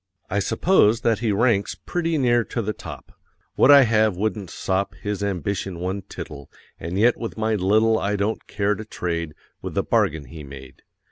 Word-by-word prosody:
I 100 - +1
suppose 115 - +3
that 115 -3 +1
he 115 -2 0
ranks 105 -1 +1
Pretty 165 -2 -2
near 120 -3 +3
to 115 - -3
the 105 +1 -2
top. - - -10 0.4
What - - +4
I 140 -1 +9
have 110 -4 +2
wouldn't 100 -2 -2
sop 95 +2 -2
His 105 -1 -4
ambition 100 -1 -2
one 95 +3 -3
tittle; 70 -6 -9 0.3
And 85 +3 -4
yet 115 +4 +4
with 115 - -6
my 110 0 0
little 110 +3 +3
I 100 +1 -1
don't 105 +2 -2
care 105 0 0
to 110 - -6
trade 85 -6 -4 0.3
With - - -6
the - - +1
bargain 75 -1 +1
he 75 +4 -10
made. 70 -1 -12
105 Hz, 185 wpm, -23 LUFS, 95-115 Hz, 0.4 s, I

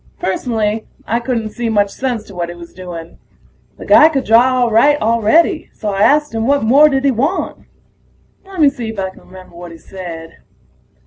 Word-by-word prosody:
Personally, 215 +2 -2 0.2
I 230 +2 -1
couldn't 235 -3 -3
see 235 0 -3
much 205 -2 +1
sense 245 -3 -3
to 205 - -15
what 175 -1 -4
he 175 - -8
was 170 0 -13
doing. 175 -2 -9 0.6
The - - -10
guy 310 - +6
could 275 -4 -2
draw 250 +3 +4
all 240 -2 +1
right 290 +7 +4
already, 230 - +1
so 215 - -4
I 195 0 -2
asked 295 +5 +3
him 225 +1 -2
what 280 -1 +2
more 280 +7 +5
did 270 -1 -1
he 275 - +4
want? 275 +10 -3 0.8
Lemme 340 -7 +2
see 235 -4 -6
if 220 - -7
I 190 -1 -3
can - - -18
remember 185 -2 -15
what 175 0 -10
he 165 - -11
said. 165 -2 -10
225 Hz, 195 wpm, -16 LUFS, 190-265 Hz, 0.8 s, guy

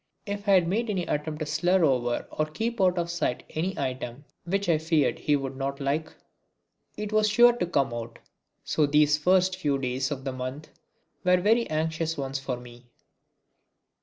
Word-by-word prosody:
If 205 0 -4
I 195 -1 +7
made 210 +7 -1
any 185 -4 -1
attempt 150 +1 -3
to - - 0
slur 175 +4 +2
over 120 -4 0
or 155 - -1
keep 225 +8 -3
out 180 -1 +3
of 170 0 -1
sight 170 -7 -1
any 180 +5 -2
item 130 0 -4 0.2
which 195 +3 -1
I 165 -3 +3
feared 160 -3 +1
he 150 - +2
would 135 -1 -3
not 135 +1 -3
like, 145 +3 -1 0.9
it 210 0 -4
was 215 0 +3
sure 240 +3 +6
to 175 - -1
come 140 -8 +1
out. 115 0 -6 0.5
So 150 -2 +1
these 150 +1 +4
first 185 +3 +3
few 145 -6 0
days 130 0 -2
of 135 -3 -5
the 135 -1 -3
month 130 +4 -6 0.5
were 180 0 +4
very 225 +6 +2
anxious 160 +1 -1
ones 135 -1 -3
for 135 -2 -3
me. 120 0 -14
155 Hz, 180 wpm, -27 LUFS, 135-185 Hz, 0.9 s, I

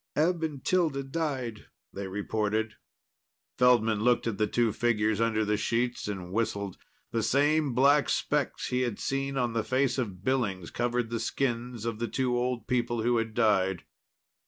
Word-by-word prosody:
"Eb 165 +3 +2
and 150 -5 -4
Tilda 160 -7 +1
died," 135 -7 -3 0.3
they 100 0 -5
reported. 105 +2 -1 0.9
Feldman 115 -4 +4
looked 120 +2 +2
at 115 -3 -2
the 105 - +2
two 115 -1 +1
figures 110 -2 +1
under 110 -1 +1
the 105 0 +1
sheets 120 +2 -1
and 95 -4 -5
whistled. 100 -3 -1 0.3
The 115 - 0
same 145 +2 +2
black 140 +3 +4
specks 145 -2 -1
he 125 0 0
had 120 -5 -1
seen 135 0 -2
on 120 -3 0
the 115 -1 0
face 130 0 +1
of 100 -7 -4
Billings 105 -9 -1
covered 120 -1 -1
the 115 - -1
skins 120 -3 -2
of 115 -2 -3
the 120 - -1
two 125 -1 0
old 120 -2 -1
people 120 -2 0
who 120 0 +2
had 115 -1 -2
died. 95 -6 +2
120 Hz, 165 wpm, -29 LUFS, 110-130 Hz, 0.9 s, Feldman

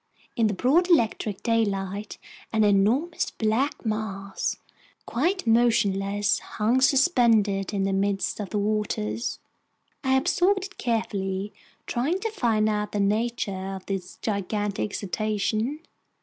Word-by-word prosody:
In 225 -2 +3
the 205 - -1
broad 310 - +3
electric 220 - +1
daylight, 205 -3 -1 0.3
an 220 -1 +2
enormous 215 - +2
black 235 +6 -1
mass, 200 -3 -2 0.5
quite 345 +10 0
motionless, 205 -4 +2
hung 230 +5 0
suspended 235 - +3
in 200 -2 -1
the 195 0 0
midst 195 +1 0
of 205 -3 -4
the 210 - -2
waters. 200 - -1 0.7
I 265 -1 +3
observed 360 +6 +2
it 405 - -13
carefully, 205 -4 -2 0.3
trying 280 +10 0
to 450 - -2
find 225 - +1
out 210 -1 -1
the 205 - 0
nature 200 -2 -1
of 190 - -9
this 190 -2 -5
gigantic 205 -1 -2
cetacean. 215 - -1
215 Hz, 120 wpm, -26 LUFS, 200-240 Hz, 0.7 s, In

